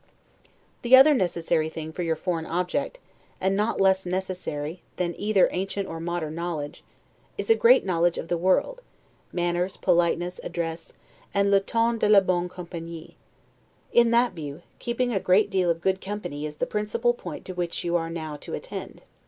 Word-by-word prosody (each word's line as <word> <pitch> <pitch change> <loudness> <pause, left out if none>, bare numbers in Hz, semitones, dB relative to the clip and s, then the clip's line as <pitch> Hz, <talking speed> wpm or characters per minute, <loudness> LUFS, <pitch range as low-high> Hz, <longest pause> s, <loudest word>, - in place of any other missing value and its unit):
The 245 +2 +7
other 270 +4 +8
thing 280 - +3
necessary 165 -3 0
for 160 +2 -6
your 165 -2 0
foreign 165 -3 -3
object, 180 - -2 0.4
and 190 +1 +1
not 210 +3 0
less 190 0 +4
necessary 180 -3 -4
than 175 -1 -1
either 205 -2 +3
ancient 195 +1 -3
or 165 - -6
modern 165 -2 -3
knowledge, 165 -3 -4 0.5
is - - 0
a - - +7
great 475 +2 +5
knowledge 175 -1 +1
of - - -5
the 175 - 0
world, 190 - +1 0.5
manners, 175 +1 -1
politeness, 175 +1 +1
address, 165 -1 -4 0.4
and 200 0 +3
'le 200 - +6
ton 230 +3 0
de 210 - +2
la 210 -1 +8
bonne 180 -1 0
compagnie'. 170 -2 -8 0.8
In 235 -1 +6
that 235 +1 +3
view, 150 0 -7 0.2
keeping 240 +1 -1
a 195 - +1
great 195 +3 +3
deal 185 -2 +2
of 165 0 0
good 190 +1 0
company, 190 -7 -4
is 150 0 -10
the - - 0
principal 210 +3 0
point - - -8
to 185 - -6
which 175 -1 -3
you 175 0 0
are 165 -1 0
now 160 -2 -5
to - - -6
attend. - - -8
180 Hz, 175 wpm, -26 LUFS, 165-200 Hz, 0.8 s, other